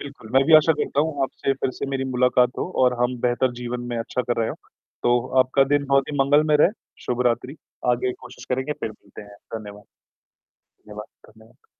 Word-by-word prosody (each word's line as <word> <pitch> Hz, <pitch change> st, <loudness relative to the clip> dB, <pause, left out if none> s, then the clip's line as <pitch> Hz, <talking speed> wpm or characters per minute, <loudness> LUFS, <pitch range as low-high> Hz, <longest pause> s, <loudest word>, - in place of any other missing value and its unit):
बिल्कुल, 140 Hz, -6 st, -10 dB
मैं 135 Hz, +1 st, +5 dB
भी 160 Hz, -, +6 dB
आशा 155 Hz, +1 st, +5 dB
करता 145 Hz, -, -1 dB
हूँ 145 Hz, -4 st, -3 dB
आपसे 135 Hz, +1 st, -1 dB
फिर 130 Hz, -1 st, -2 dB
से -, -, -3 dB
मेरी 135 Hz, -1 st, -2 dB
मुलाकात 125 Hz, 0 st, +3 dB
हो -, -, -1 dB, 0.2 s
और 125 Hz, 0 st, +3 dB
हम 125 Hz, 0 st, 0 dB
बेहतर 125 Hz, +1 st, +1 dB
जीवन 120 Hz, 0 st, -4 dB
में 120 Hz, -, -2 dB
अच्छा 120 Hz, +2 st, -2 dB
कर 120 Hz, -1 st, -1 dB
रहे 110 Hz, -, 0 dB
हो, -, -, -4 dB, 0.5 s
तो 120 Hz, +1 st, +2 dB
आपका 135 Hz, +2 st, +3 dB
दिन 145 Hz, -1 st, +1 dB
बहुत 135 Hz, -1 st, +2 dB
ही -, -, -3 dB
मंगलमय 150 Hz, +2 st, +4 dB
रहे, 180 Hz, -, +6 dB, 0.3 s
शुभ 125 Hz, 0 st, -1 dB
रात्रि। 125 Hz, +5 st, -1 dB, 0.3 s
आगे 125 Hz, +1 st, 0 dB
कोशिश -, -, -13 dB
करेंगे, 130 Hz, +3 st, -1 dB
फिर 110 Hz, -, -5 dB
मिलते 105 Hz, -, -13 dB
हैं, 105 Hz, 0 st, -15 dB, 0.2 s
धन्यवाद। 105 Hz, -2 st, -8 dB, 0.8 s
धन्यवाद, 105 Hz, 0 st, -12 dB, 0.2 s
धन्यवाद। 110 Hz, +1 st, -22 dB
125 Hz, 200 wpm, -23 LUFS, 120-135 Hz, 0.8 s, भी